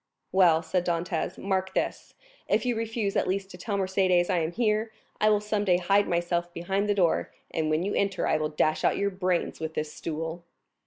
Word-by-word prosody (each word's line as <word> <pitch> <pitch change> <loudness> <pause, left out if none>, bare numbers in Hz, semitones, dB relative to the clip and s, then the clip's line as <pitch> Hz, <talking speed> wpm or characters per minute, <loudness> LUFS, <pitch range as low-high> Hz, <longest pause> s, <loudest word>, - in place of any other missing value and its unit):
"Well," 170 -4 +5
said 175 +2 0
Dantès, 175 0 -2
"mark 190 -1 -2
this; - - -2 0.3
if - - +1
you 245 -1 +1
refuse 225 -2 -2
at - - +1
least 195 +1 -2
to 180 - -10
tell 200 +2 -2
Mercédès 185 -1 +2
I 180 - +2
am 160 0 -1
here, 220 +1 0 0.3
I 215 - +4
will 210 -1 +4
some 210 0 -1
day 180 -3 +3
hide 195 +3 +2
myself 175 0 0
behind 195 +4 -1
the 205 - +3
door, 180 -4 +1 0.2
and 160 -1 -1
when 155 +2 +1
you 200 - -1
enter 195 -1 0
I - - +2
will 155 0 -1
dash 155 0 +1
out - - +3
your 200 0 0
brains 185 -2 -1
with 160 0 -5
this 155 0 -3
stool." 165 +1 -5
185 Hz, 210 wpm, -27 LUFS, 170-200 Hz, 0.3 s, Well